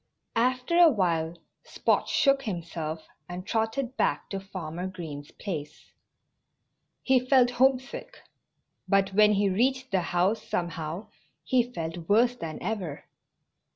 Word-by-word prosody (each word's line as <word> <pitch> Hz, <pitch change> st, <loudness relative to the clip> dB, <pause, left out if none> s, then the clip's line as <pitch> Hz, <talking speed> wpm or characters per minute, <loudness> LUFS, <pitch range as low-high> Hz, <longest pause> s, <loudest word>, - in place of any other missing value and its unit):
After 255 Hz, +8 st, +2 dB
a 345 Hz, -2 st, +9 dB
while 170 Hz, -, 0 dB, 0.3 s
Spot -, -, 0 dB
shook 275 Hz, -1 st, +3 dB
himself 165 Hz, -7 st, -5 dB, 0.2 s
and 180 Hz, +1 st, -6 dB
trotted 230 Hz, +4 st, -1 dB
back 145 Hz, -, 0 dB
to 195 Hz, -, -2 dB
Farmer 180 Hz, -2 st, -6 dB
Green's 155 Hz, -6 st, -7 dB
place. 155 Hz, -8 st, -7 dB, 1.1 s
He 260 Hz, -1 st, +4 dB
felt 255 Hz, -1 st, +4 dB
homesick. 260 Hz, +1 st, 0 dB, 0.7 s
But 195 Hz, -1 st, +2 dB
when 210 Hz, +1 st, +6 dB
he 200 Hz, 0 st, +2 dB
reached 260 Hz, +7 st, +1 dB
the 190 Hz, -2 st, +2 dB
house 180 Hz, +5 st, +1 dB
somehow 170 Hz, +2 st, -4 dB, 0.3 s
he 245 Hz, -1 st, +1 dB
felt 165 Hz, -4 st, -5 dB
worse 240 Hz, +4 st, +4 dB
than 165 Hz, -9 st, -6 dB
ever. 185 Hz, -10 st, -4 dB
195 Hz, 120 wpm, -27 LUFS, 170-245 Hz, 1.1 s, a